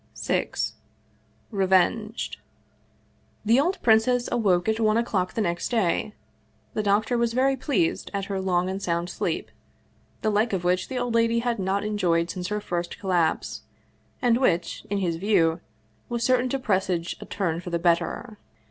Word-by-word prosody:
VI - - 0 1.0
REVENGED 200 +3 +1 1.1
THE 230 +4 +5
old 355 +7 +1
princess 240 +2 +4
awoke 190 -6 +2
at 220 0 +1
one 215 -1 +3
o'clock 200 -6 0
the 225 - 0
next 175 -3 -1
day. 215 -2 0 0.6
The 215 - 0
doctor 215 +4 +1
was 235 -1 +1
very 265 +2 +3
pleased 330 +6 0
at 200 -1 -2
her 195 -1 -3
long 180 -1 +1
and 190 +1 -3
sound 170 -1 -1
sleep, - - -3 0.7
the 215 - +2
like 210 +2 +1
of 185 -2 -1
which 180 +1 +1
the 260 - -4
old 245 -1 -1
lady 230 0 +3
had 235 -2 -1
not 195 +1 0
enjoyed 175 -5 +1
since 180 -1 -4
her 210 +1 -1
first 175 -4 -4
collapse, 180 -5 0 0.6
and 240 -1 +4
which, 175 -10 0
in 205 - 0
his 175 -4 -1
view, 175 -4 +2 0.5
was 235 -1 -2
certain 255 0 +2
to 275 - 0
presage 190 -8 0
a - - -7
turn 175 -4 -2
for 180 - -7
the 170 - 0
better. 175 +6 0
205 Hz, 165 wpm, -25 LUFS, 180-230 Hz, 1.1 s, THE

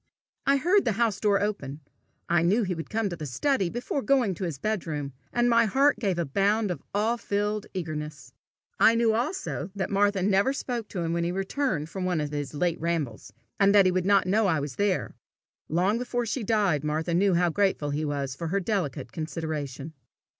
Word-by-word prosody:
I 275 0 +5
heard 365 +8 +3
the 230 - +1
house 220 -2 +1
door 205 -1 +3
open. 155 -9 -3 0.5
I 170 -1 +3
knew 200 +8 +3
he 185 -2 -1
would 165 -2 -6
come 220 -1 0
to 175 - -4
the 155 -3 -6
study 195 - 0
before 245 +6 -3
going 245 -4 +2
to 180 +2 -4
his 165 -5 -4
bedroom, 150 -6 -3 0.2
and 240 0 +2
my 230 -1 +5
heart 270 +3 +3
gave 195 -6 0
a 170 - 0
bound 200 +7 +1
of 175 - -5
awe 220 +4 +1
filled 210 -1 -2
eagerness. 155 -3 -5 0.5
I 230 - +6
knew 230 -1 +3
also 300 - -2
that 195 0 -2
Martha 200 -1 +2
never 200 +6 +3
spoke 240 -5 -4
to 180 - -4
him 165 0 -1
when 170 0 0
he 170 - 0
returned 195 - -1
from 185 +3 -4
one 180 -3 0
of 150 -1 -3
his 145 -1 -4
late 170 +2 0
rambles, 155 -12 -2 0.3
and 200 0 +5
that 200 -2 +7
he 185 - +4
would 185 0 0
not 200 -2 +4
know 205 +3 +2
I 160 -5 +2
was 140 -2 -5
there: 200 -2 0 0.6
long 185 +8 +1
before 245 -1 -2
she 230 +2 -2
died 200 -9 +1
Martha 155 +3 -1
knew 190 +1 +3
how 175 0 +2
grateful 190 -6 +1
he 150 +2 -1
was 140 -3 -2
for 165 +3 -4
her 195 +5 0
delicate 180 - -2
consideration. 155 -2 -5
190 Hz, 205 wpm, -27 LUFS, 160-215 Hz, 0.6 s, that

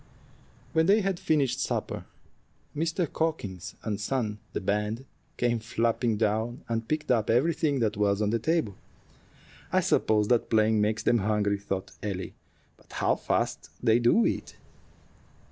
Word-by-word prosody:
When 160 +1 +3
they 210 +3 +5
had 195 -3 -1
finished 140 -5 +1
supper, - - -2 0.7
Mr. 165 +3 0
Cawkins 100 - -3
and 105 -2 -3
son 105 -2 -1
the - - -2
band 105 +5 -1 0.3
came 120 -1 +1
flapping 115 0 0
down 110 +3 -1
and 115 -1 -2
picked 155 0 -1
up 115 -4 +2
everything 140 +2 +2
that 110 -2 0
was 100 -1 +2
on 105 -1 +1
the 115 - +1
table. 160 -5 0 1.0
"I - - +3
suppose 105 -1 +2
that 120 -2 +2
playing 110 -1 +3
makes 110 +1 0
them 120 0 +3
hungry," 105 0 +1
thought 95 -1 -4
Ellie; 95 -3 -4 0.4
"but - - -19
how - - +2
fast - - -1
they 115 -1 +4
do 120 - +4
eat!" - - -2
115 Hz, 145 wpm, -28 LUFS, 105-135 Hz, 1.0 s, they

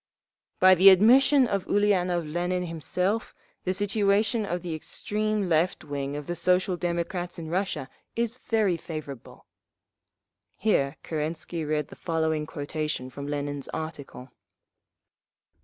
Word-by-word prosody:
"… - - -67
By 185 0 +8
the 185 +2 +8
admission 255 +8 +6
of 200 -5 -2
Ulianov 185 -4 +2
Lenin 175 +3 -1
himself, 180 +6 -2 0.3
the 185 - +1
situation 205 +2 +1
of 175 -1 -3
the 170 -2 -4
extreme 210 +5 -2
left 170 +2 +1
wing 140 -1 -4
of 145 0 -5
the 175 - -3
Social 180 +1 +2
Democrats 175 +1 -3
in 160 -1 -6
Russia 175 -7 -1 0.3
is 235 +1 -1
very 220 -8 +1
favourable." 155 -7 -8 1.1
(Here 150 -9 +1
Kerensky 160 +1 -3
read 150 -1 -1
the - - -11
following 160 -2 -1
quotation 150 -3 -4
from 140 +2 -7
Lenin's 145 -1 -3
article.) 140 -5 -7
175 Hz, 125 wpm, -27 LUFS, 155-200 Hz, 1.1 s, By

